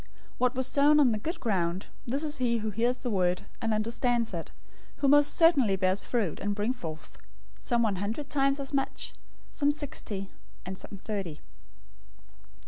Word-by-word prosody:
013:023 - - -24 0.3
What 250 +1 +2
was 260 0 +1
sown 295 +3 +5
on 270 -5 +5
the 215 - -1
good 330 - -4
ground, 185 -4 0 0.2
this 275 +6 -1
is 300 -1 -2
he 235 -2 +2
who 215 -1 -2
hears 240 +4 +1
the 250 -1 -4
word, 180 -2 +1 0.2
and 225 - 0
understands 230 +1 0
it, 165 -2 -4 0.5
who 280 - 0
most 290 +1 +6
certainly 280 - +5
bears 185 +1 +1
fruit, 220 -10 -1
and 205 0 -1
brings 220 +5 -1
forth, 155 -6 -8 0.4
some 235 -2 +1
one 205 -4 +1
hundred 220 +9 -3
times 275 -1 +2
as 275 +1 -5
much, 270 -1 -2 0.4
some 285 - +1
sixty, 220 -9 -3 0.3
and 190 +1 -5
some 200 - -9
thirty." 195 -8 -4
230 Hz, 175 wpm, -29 LUFS, 200-275 Hz, 0.5 s, most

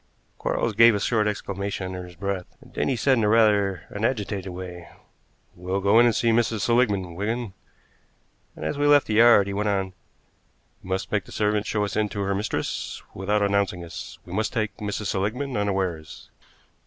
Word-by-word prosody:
Quarles 115 - -1
gave 115 +1 +6
a - - 0
short 110 0 +1
exclamation 100 -1 -3
underneath 90 -1 -6
his 90 - -14
breath, 95 0 -3
and - - -18
then - - -1
he 135 - +1
said 130 +1 +2
in 110 - +2
rather 105 -4 +3
an 105 - -6
agitated 105 -5 -1
way: 90 -1 -8 0.7
"Well 90 +2 -2
go 100 +3 +4
in 120 - +6
and 115 - +2
see 115 - +2
Mrs. 115 -2 +1
Seligmann, 105 -7 +1
Wigan." 110 +3 -3 1.0
And - - -7
as 145 - -2
we 145 - +3
left 145 -1 +6
the 110 - -3
yard 115 -2 +6
he 100 - -4
went 105 +1 0
on: 95 -2 -1 0.9
"You 95 - -11
must 95 0 -2
make 105 -3 0
the - - -14
servant 105 0 0
show 105 -1 0
us 100 - -5
in 105 -1 +1
to 100 -1 -4
her 100 0 0
mistress 100 +3 -3
without 105 +2 0
announcing 100 -3 0
us. 85 - -8
We 90 - -9
must 110 +3 -1
take 110 -3 -1
Mrs. 105 0 -4
Seligmann 110 +8 -2
unawares." 95 -7 -3
105 Hz, 190 wpm, -25 LUFS, 95-110 Hz, 1.0 s, gave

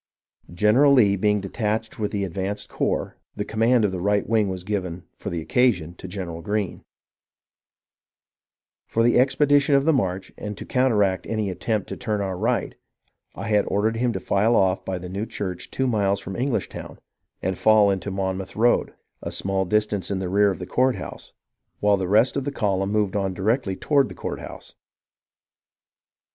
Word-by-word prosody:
General 110 +10 +4
Lee 105 -7 +5
being 105 +1 +1
detached 110 +3 -3
with 105 -1 0
the 100 -2 -2
advanced 95 +2 -3
corps, - - -2 0.2
the - - -3
com 110 - -6
mand 115 0 +4
of 100 - 0
the 90 -2 -4
right 100 +1 +1
wing 110 -3 +2
was 95 -1 -5
given, 90 -4 -3
for - - -6
the 85 -1 -3
occasion, 90 -2 +1
to 95 - -10
General 90 -3 -6
Greene. 105 0 -2 2.0
For 115 - +1
the 120 +1 +4
expedition 145 +2 +4
of 140 0 +3
the 160 - +4
march, 95 -7 -1
and 105 -1 -5
to - - -7
counteract 105 -8 +1
any 110 -3 -1
attempt 105 +3 -2
to - - -5
turn 110 -4 -2
our 95 -2 -2
right, 115 +6 -1 0.6
I - - -5
had 105 -1 +3
ordered 110 +3 0
him 120 +1 +1
to - - -3
file 110 +4 +2
off 95 -2 +2
by 95 - -3
the 90 0 -7
new 100 +5 -4
church 95 -4 -5
two 130 - -1
miles 100 -5 +1
from 95 - -7
Englishtown, 125 +4 -3 0.5
and 95 +1 0
fall 105 0 +5
into 95 +1 -3
the 95 - -5
Monmouth 95 0 -3
road, 120 +3 +2 0.3
a - - -5
small 95 0 -1
distance 105 0 0
in 100 - -1
the 95 -1 -3
rear 100 +2 +4
of 95 - -2
the 90 - -6
courthouse, 130 +5 -1 0.5
while 105 -1 +3
the 95 -1 -2
rest 110 +5 +4
of 140 - -1
the 145 - -3
column 100 -5 0
moved 105 -2 0
on 95 -2 -1
directly 105 +1 0
toward 140 +4 +2
the - - -9
courthouse. - - -7
105 Hz, 180 wpm, -24 LUFS, 95-115 Hz, 2.0 s, Lee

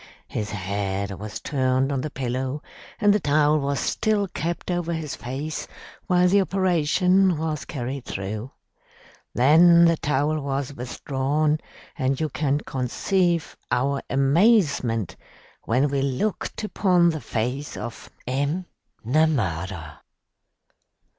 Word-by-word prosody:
His 105 -1 -3
head 100 0 -3
was 105 +2 -6
turned 130 -1 0
on 135 -2 -1
the 155 - -3
pillow 130 +2 -3 0.4
and 205 -3 +5
the 210 - +2
towel 150 -1 +3
was 140 0 -1
still 215 -2 0
kept 170 +1 -3
over 175 -1 -1
his 160 -3 -4
face 140 +5 -5 0.4
while 180 -1 +4
the 200 +2 +4
operation 185 0 +2
was 155 -1 -3
carried 130 -1 -5
through. 105 +5 -5 0.9
Then 170 +6 +7
the 165 -1 +4
towel 150 +2 0
was 140 0 -3
withdrawn, 140 +4 -1 0.4
and 130 +1 0
you 155 -1 0
can 145 +1 0
conceive 170 - 0
our 135 +3 +1
amazement 135 - +2 0.5
when 130 +5 +2
we 140 -1 0
looked 140 +11 -2
upon 180 -5 +3
the 155 -2 -5
face 125 +6 -3
of 120 -2 -7 0.2
M'Namara. 125 - -2
140 Hz, 115 wpm, -24 LUFS, 125-170 Hz, 0.9 s, Then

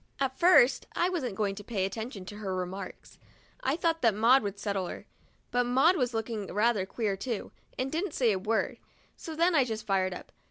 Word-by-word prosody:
At 265 -1 0
first 310 -8 +5
I 350 - +2
wasn't 265 - -2
going 200 -1 0
to 205 +1 -9
pay 230 - -9
any - - +2
attention 215 0 -5
to 205 +2 -8
her 195 -3 -3
remarks 185 +1 -6 0.2
— - - -31
I 265 +3 +1
thought 330 0 0
that 230 -4 +3
Maud 240 +5 +5
would 200 -1 -4
settle 200 -3 -2
her; - - -8 0.5
but 245 0 +2
Maud 265 +9 +4
was 250 -7 0
looking 220 -2 -3
rather 210 -1 +1
queer, 210 -2 -1
too, 225 +2 -4 0.3
and 260 +1 -2
didn't 330 +1 -2
say 240 -4 +3
a 190 - 0
word; 220 +4 -1 0.4
so 320 - -8
then 340 +3 +3
I 290 -5 +5
just 220 -3 -4
fired 185 -2 +1
up. - - -11
225 Hz, 215 wpm, -29 LUFS, 200-265 Hz, 0.5 s, first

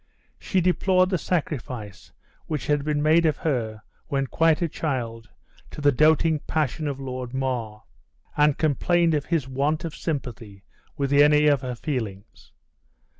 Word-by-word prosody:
She 190 - 0
deplored 185 +1 +2
the 185 - +1
sacrifice 125 - -4 0.4
which 150 -4 -3
had 145 -1 +1
been 150 0 -1
made 160 +2 +4
of 155 - 0
her, 110 -8 -2 0.2
when 140 -2 0
quite 165 +3 +2
a 170 - 0
child, 120 -8 -4 0.4
to - - -10
the 145 -1 +4
doting 155 +3 +3
passion 155 -1 -1
of 140 -2 -4
Lord 130 -1 -6
Mar; 120 -5 -3 0.5
and 150 -1 +3
complained 165 +2 +2
of 145 -2 0
his 160 -7 -1
want 140 +5 -1
of 165 - -6
sympathy 115 - -5 0.3
with 140 0 -1
any 150 +1 +5
of 145 -3 +4
her 125 -2 -4
feelings. 110 -7 -6
145 Hz, 150 wpm, -24 LUFS, 125-155 Hz, 0.5 s, any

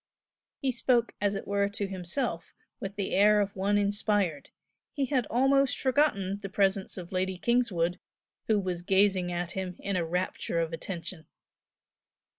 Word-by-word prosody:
He 270 -2 0
spoke 240 -1 +1
as 205 0 +1
it - - -5
were 200 0 +1
to 205 0 -3
himself 185 +1 -3 0.2
with 195 +1 -5
the 200 -1 -2
air 210 +2 +5
of 200 -1 -1
one 200 +2 +1
inspired; 205 -5 0 0.4
he 280 -2 0
had 255 -4 0
almost 270 +2 +3
forgotten 230 -9 +1
the 195 - -5
presence 195 0 +1
of 175 -2 -7
Lady 185 0 -1
Kingswood, 185 -7 +1 0.5
who 215 -2 +3
was 180 -3 -3
gazing 190 -1 +2
at 175 0 -2
him 185 -1 -4
in 200 -1 -3
a 175 - +1
rapture 175 0 -2
of 165 0 -1
attention. 170 0 -6
195 Hz, 155 wpm, -29 LUFS, 180-210 Hz, 0.5 s, air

